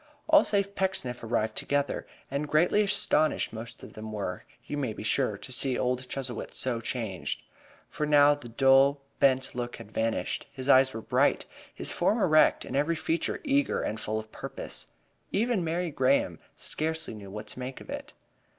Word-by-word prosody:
All 310 Hz, -1 st, +7 dB
save 200 Hz, -1 st, 0 dB
Pecksniff 185 Hz, -12 st, -2 dB
arrived 110 Hz, -1 st, 0 dB
together, 145 Hz, 0 st, -1 dB, 0.2 s
and 140 Hz, +2 st, -1 dB
greatly 175 Hz, +7 st, +4 dB
astonished 195 Hz, -, +1 dB
most 115 Hz, +1 st, -8 dB
of -, -, -10 dB
them 110 Hz, 0 st, -7 dB
were, 100 Hz, -4 st, -4 dB, 0.2 s
you -, -, -4 dB
may 130 Hz, -6 st, -1 dB
be -, -, -7 dB
sure, 110 Hz, -2 st, +1 dB
to 130 Hz, -, -10 dB
see 130 Hz, 0 st, +2 dB
old 125 Hz, 0 st, -1 dB
Chuzzlewit 130 Hz, -4 st, -4 dB
so 120 Hz, -3 st, +1 dB
changed. 110 Hz, -, -3 dB, 0.4 s
For 150 Hz, -, -3 dB
now 145 Hz, -1 st, +6 dB
the 145 Hz, -5 st, -8 dB
dull, 135 Hz, +3 st, +4 dB, 0.2 s
bent 130 Hz, -1 st, +3 dB
look 120 Hz, 0 st, -4 dB
had 105 Hz, -, -11 dB
vanished. 115 Hz, 0 st, -1 dB
His 130 Hz, 0 st, -6 dB
eyes 130 Hz, -2 st, +5 dB
were 115 Hz, -, -4 dB
bright, -, -, +2 dB, 0.3 s
his -, -, -3 dB
form 215 Hz, -, +2 dB
erect 155 Hz, -6 st, +4 dB
and -, -, -5 dB
every 150 Hz, +4 st, +2 dB
feature 165 Hz, +1 st, -1 dB
eager 280 Hz, -1 st, +1 dB
and 110 Hz, -, -3 dB
full 110 Hz, 0 st, -2 dB
of 110 Hz, 0 st, -6 dB
purpose. -, -, -5 dB, 0.4 s
Even 220 Hz, -3 st, +1 dB
Mary 170 Hz, +1 st, -1 dB
Graham 130 Hz, -, +2 dB, 0.2 s
scarcely 160 Hz, -2 st, -2 dB
knew 100 Hz, -2 st, -9 dB
what 105 Hz, +2 st, -6 dB
to 125 Hz, -, -6 dB
make 130 Hz, +1 st, -5 dB
of -, -, -10 dB
it. -, -, -6 dB
135 Hz, 180 wpm, -28 LUFS, 115-155 Hz, 0.4 s, All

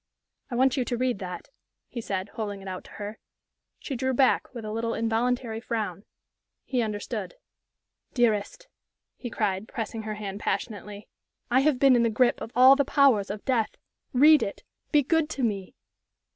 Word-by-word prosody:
"I 245 Hz, -, -4 dB
want 260 Hz, +2 st, +3 dB
you 255 Hz, -, +1 dB
to 240 Hz, -, -2 dB
read 250 Hz, -4 st, 0 dB
that," 180 Hz, -, -7 dB, 0.4 s
he 235 Hz, -, -6 dB
said, 195 Hz, -2 st, -3 dB
holding 205 Hz, -2 st, -5 dB
it -, -, -9 dB
out 185 Hz, -1 st, -5 dB
to -, -, -14 dB
her. 210 Hz, +1 st, -7 dB, 0.6 s
She 275 Hz, -, -5 dB
drew 260 Hz, +1 st, -1 dB
back, 260 Hz, 0 st, +3 dB
with 235 Hz, -3 st, -7 dB
a 215 Hz, -, -4 dB
little, 230 Hz, +1 st, -2 dB
involuntary 230 Hz, +1 st, 0 dB
frown. 215 Hz, -5 st, -4 dB, 0.6 s
He 250 Hz, -2 st, 0 dB
understood. 210 Hz, -, -4 dB, 0.8 s
"Dearest," 240 Hz, -, 0 dB, 0.5 s
he 245 Hz, -, -6 dB
cried, 210 Hz, -2 st, -1 dB
pressing 225 Hz, -1 st, -4 dB
her 215 Hz, 0 st, -4 dB
hand 205 Hz, -1 st, -6 dB
passionately, 210 Hz, -1 st, -4 dB, 0.4 s
"I 255 Hz, -, +5 dB
have 280 Hz, -1 st, +3 dB
been 270 Hz, 0 st, +5 dB
in 240 Hz, -, +4 dB
the 230 Hz, -, +3 dB
grip 240 Hz, +3 st, +2 dB
of 225 Hz, -, -6 dB
all 260 Hz, +2 st, +8 dB
the 280 Hz, -, +2 dB
powers 265 Hz, -8 st, +3 dB
of 205 Hz, +1 st, -6 dB
death! 240 Hz, -5 st, 0 dB, 0.4 s
Read 295 Hz, +3 st, +6 dB
it 200 Hz, -, -4 dB, 0.3 s
be 295 Hz, -2 st, +4 dB
good 320 Hz, +2 st, +1 dB
to 270 Hz, -, -3 dB
me!" 200 Hz, -5 st, -2 dB
230 Hz, 175 wpm, -27 LUFS, 210-255 Hz, 0.8 s, all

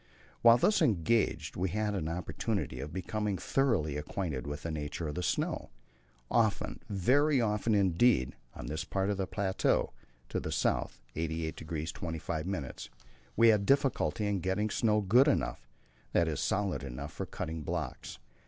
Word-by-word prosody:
While 115 Hz, 0 st, +8 dB
thus 205 Hz, -, +3 dB
engaged 115 Hz, -, +1 dB
we 90 Hz, +1 st, 0 dB
had 105 Hz, +2 st, -1 dB
an 90 Hz, -6 st, -2 dB
opportunity 85 Hz, -6 st, -2 dB
of 70 Hz, +3 st, -5 dB
becoming 100 Hz, +2 st, -2 dB
thoroughly 95 Hz, -, +1 dB
acquainted 75 Hz, -3 st, -3 dB
with 75 Hz, 0 st, -5 dB
the 85 Hz, -, -3 dB
nature 75 Hz, +1 st, -4 dB
of 75 Hz, -, -3 dB
the 90 Hz, -, -3 dB
snow. 70 Hz, -5 st, -1 dB, 0.6 s
Often 110 Hz, -4 st, +1 dB
very 135 Hz, -, +3 dB
often 105 Hz, -1 st, +1 dB
indeed 95 Hz, -, +3 dB, 0.2 s
on -, -, -7 dB
this 80 Hz, +5 st, -3 dB
part 95 Hz, +4 st, -1 dB
of 100 Hz, -, -2 dB
the 95 Hz, -1 st, -1 dB
plateau, 95 Hz, -9 st, 0 dB, 0.4 s
to -, -, -1 dB
the -, -, -4 dB
south -, -, 0 dB, 0.2 s
of 80 Hz, -, -2 dB
88° 80 Hz, 0 st, -3 dB
25', 80 Hz, -2 st, -4 dB, 0.5 s
we 115 Hz, 0 st, +6 dB
had 105 Hz, -2 st, +4 dB
difficulty 135 Hz, -5 st, +2 dB
in 100 Hz, -1 st, 0 dB
getting 95 Hz, +4 st, 0 dB
snow 105 Hz, -1 st, +2 dB
good 120 Hz, +8 st, +5 dB
enough -, -, 0 dB, 0.5 s
that 85 Hz, -, +3 dB
is, 75 Hz, -3 st, -2 dB
solid 100 Hz, -5 st, 0 dB
enough 70 Hz, +3 st, -6 dB
for 95 Hz, -, -5 dB
cutting 80 Hz, -2 st, -5 dB
blocks. -, -, -4 dB
95 Hz, 155 wpm, -31 LUFS, 80-105 Hz, 0.6 s, While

